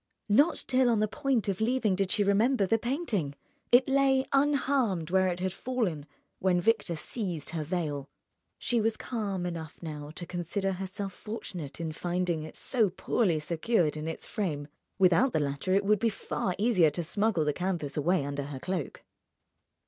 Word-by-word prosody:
Not 285 +11 +4
till 255 -1 +3
on 230 -3 +3
the 215 - +2
point 270 -2 0
of 195 0 -1
leaving 230 -3 +2
did 195 0 0
she 205 +1 +3
remember 205 +3 +3
the 225 +4 +2
painting. 230 - -2 0.4
It 245 +2 +6
lay 270 -1 +3
unharmed 270 - +2
where 190 0 +4
it 180 -1 -1
had 185 0 -1
fallen 195 - -2 0.3
when 180 -1 +2
Victor 205 -2 +1
seized 170 - -4
her 165 -2 -2
veil. 150 -4 -3 0.5
She 240 -2 0
was 220 0 0
calm 200 -7 -3
enough 165 -3 -5
now 150 -3 -6
to 175 - -6
consider 180 +3 -2
herself 190 +1 -5
fortunate 185 -11 -7
in 165 -1 -3
finding 175 0 -1
it 155 0 -8
so 225 -6 +1
poorly 180 -1 +1
secured 165 +2 +1
in 155 +1 -4
its 160 - -5
frame; 155 -9 -3 0.3
without 190 +7 +4
the - - +2
latter 145 +6 0
it 200 0 +2
would 210 0 +4
be 230 - +2
far 190 -3 -3
easier 200 -6 +4
to 170 +4 -4
smuggle 200 -1 +1
the 150 - +1
canvas 175 -4 -2
away 155 0 +1
under 140 0 -3
her 140 -1 -6
cloak. 170 +1 -4
190 Hz, 175 wpm, -29 LUFS, 160-225 Hz, 0.5 s, It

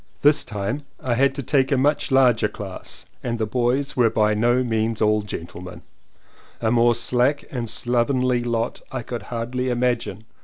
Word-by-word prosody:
This 145 0 +5
time 105 +7 -3 0.2
I 125 - -1
had 135 +3 +2
to 140 - -4
take 135 +1 +2
a 140 - +3
much 145 +3 +1
larger 130 -4 +4
class - - -7 0.2
and 120 -1 -2
the 110 - 0
boys 125 +5 0
were 120 -3 +4
by 105 -1 +2
no 120 +4 +2
means 110 -1 -1
all 105 0 +3
gentlemen, 90 -2 -8 0.8
A 110 - 0
more 120 0 +4
slack 125 +5 +1
and 125 - -3
more 115 - -4
slovenly 125 +2 +1
lot 120 0 -2
I 130 -2 -4
could 120 +1 -5
hardly 125 +2 -2
imagine. 120 -4 -1
120 Hz, 175 wpm, -23 LUFS, 115-130 Hz, 0.8 s, This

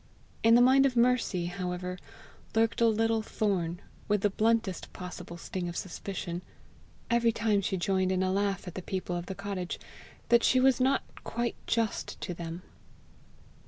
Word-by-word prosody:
In 225 +1 +6
the 245 - +7
mind 270 +2 +6
of 255 - -3
Mercy, 235 -7 +2
however, 180 0 -3 0.6
lurked 225 +1 +2
a 230 - +6
little 225 0 +2
thorn, 180 -6 -1 0.3
with 210 -1 +2
the 205 - +2
bluntest 220 -3 0
possible 180 -1 -7
sting 175 +1 -4
of 170 - -5
suspicion, 180 -1 -4 0.7
every 235 -1 +4
time 220 -3 +1
she 190 0 -1
joined 190 +1 +1
in 185 0 +1
a 185 - +1
laugh 195 0 0
at 180 - -6
the 185 - -5
people 180 -1 -3
of 175 0 -4
the 190 - -4
cottage, 195 -3 -4 0.5
that 235 0 +5
she 255 - +4
was 260 -1 +4
not 265 +2 +3 0.2
quite 235 0 -2
just 230 -2 -1
to 180 - -3
them. 170 +1 -6
200 Hz, 165 wpm, -30 LUFS, 180-230 Hz, 0.7 s, the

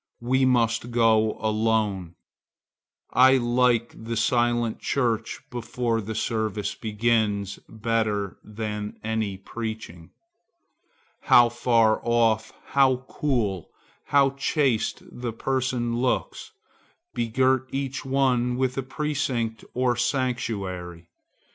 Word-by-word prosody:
We 130 +2 +2
must 120 -2 +2
go 110 -2 +3
alone. 110 -5 0 1.0
I 130 +2 +6
like 120 -1 +2
the 115 +1 -5
silent 120 0 +1
church 115 -4 -1
before 120 -1 -2
the 110 +2 -5
service 110 -2 -1
begins, 105 -3 0
better 110 -3 -1
than 105 -1 -5
any 110 -3 -2
preaching. 110 -5 -7 1.2
How 120 -1 +7
far 115 -2 +3
off, 115 -2 +2 0.2
how 130 -2 +3
cool, 110 - -1 0.4
how 140 -1 +4
chaste 140 -3 0
the 120 -2 -6
persons 125 -1 -1
look, 125 +1 0 0.8
begirt 130 +3 +1
each 135 0 -3
one 130 -2 +1
with 130 0 0
a - - +1
precinct 130 -5 -2
or 125 -1 +2
sanctuary! 100 - -2
115 Hz, 95 wpm, -25 LUFS, 110-125 Hz, 1.2 s, How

